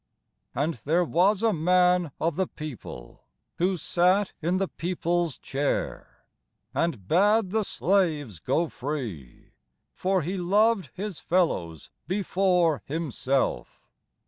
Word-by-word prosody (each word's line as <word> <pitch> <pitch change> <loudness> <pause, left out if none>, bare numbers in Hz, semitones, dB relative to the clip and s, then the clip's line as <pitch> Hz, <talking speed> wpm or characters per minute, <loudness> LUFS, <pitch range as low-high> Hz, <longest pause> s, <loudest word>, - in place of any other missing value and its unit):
And 150 +5 0
there 165 +5 +2
was 185 +6 +2
a 225 -2 +3
man 180 0 +3
of 165 +1 0
the 190 -1 0
people, 130 - -9 0.4
Who 185 +2 +2
sat 185 +5 +2
in 175 +3 +1
the 195 0 0
people's 175 -3 -1
chair, 140 +1 -3 0.5
And 130 - -1
bade 205 - +3
the 220 +1 +2
slaves 160 - 0
go 165 - 0
free; 120 - -6 0.4
For 185 -2 0
he 185 +6 -3
loved 200 - +2
his 200 -2 -5
fellows 90 - -1 0.2
before 180 -4 +1
himself. 135 - -2
175 Hz, 115 wpm, -26 LUFS, 150-190 Hz, 0.5 s, a